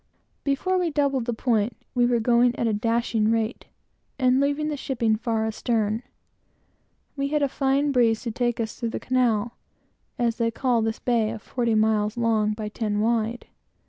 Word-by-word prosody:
Before 365 +7 0
we 355 -2 +1
doubled 280 -5 0
the 240 - -1
point, 225 -1 0 0.2
we 245 -1 +3
were 240 -1 +2
going 240 +1 +3
at - - 0
a 225 - +1
dashing 230 0 +1
rate, 225 0 -1 0.5
and 255 -1 +3
leaving 285 +2 0
the 300 - -2
shipping 235 -5 0
far 220 0 -1
astern. 220 0 -1 1.1
We 275 -1 -1
had 295 0 0
a - - +3
fine 275 +1 +1
breeze 230 -4 +2
to 235 - -3
take 240 +1 -1
us 225 -1 -4
through 235 -2 -1
the - - -4
Canal, 240 -3 0 0.6
as 235 -2 0
they 230 -2 +1
call 240 0 +1
this 220 +1 -1
bay 230 -3 +1
of 220 -1 -7
forty 235 -3 -1
miles 215 +1 +1
long 220 -2 +1
by 210 0 -5
ten 210 -1 -2
wide. 230 +1 0
235 Hz, 175 wpm, -25 LUFS, 220-255 Hz, 1.1 s, we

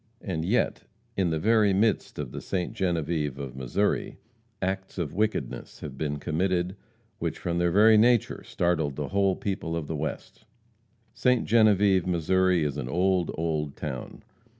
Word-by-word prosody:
And 80 -5 -2
yet, 105 +9 0 0.3
in 95 -3 +1
the 80 - 0
very 105 +2 +3
midst 105 +2 +1
of 70 -5 -4
the - - -6
Ste. 90 -2 -2
Genevieve 80 -6 -1
of 65 -2 -6
Missouri, 65 +11 -1 0.4
acts 95 +1 -3
of 85 -6 -3
wickedness 110 +3 -2
have - - -7
been 75 -2 -2
committed 90 +4 -1 0.4
which - - -2
from, 85 0 -2
their 85 0 +2
very 105 +4 +6
nature, 120 0 +3
startled 80 -5 0
the 75 -1 -4
whole 100 -1 +2
people 95 -4 -3
of 80 - -3
the 80 - -4
West. 75 +1 -5 0.7
Ste. 125 +2 +2
Genevieve, 105 -4 +4
Missouri, 90 0 +2
is 75 -1 -2
an 65 -4 -4
old, 90 +2 +1
old 75 -3 -2
town. 65 -5 -6
90 Hz, 155 wpm, -27 LUFS, 75-100 Hz, 0.7 s, very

